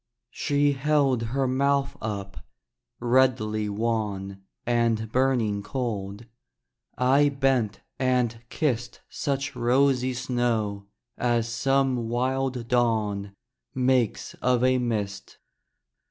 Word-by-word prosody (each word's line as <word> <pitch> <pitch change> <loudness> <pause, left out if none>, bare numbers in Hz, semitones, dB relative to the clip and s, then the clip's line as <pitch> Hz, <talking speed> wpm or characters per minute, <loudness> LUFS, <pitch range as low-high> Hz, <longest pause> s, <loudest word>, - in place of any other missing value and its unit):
She 145 0 +1
held 140 -3 +2
her 135 +2 0
mouth 140 +1 +1
up, 100 -2 -5 0.6
redly 120 -4 +2
wan 100 -3 -2 0.2
And 115 -2 +1
burning 120 -6 +1
cold: 105 -3 -4 0.7
I 135 +3 +4
bent 135 -6 0 0.2
and 125 -3 +1
kissed 120 -6 -2
Such 140 -1 -2
rosy 130 +1 +2
snow 115 -5 -1 0.3
as 120 -2 +1
some 125 0 +1
wild 130 0 -1
dawn 110 -5 0 0.4
Makes 125 -3 +1
of 125 -1 +2
a 130 0 +3
mist. 105 -5 -3
120 Hz, 95 wpm, -26 LUFS, 110-130 Hz, 0.7 s, I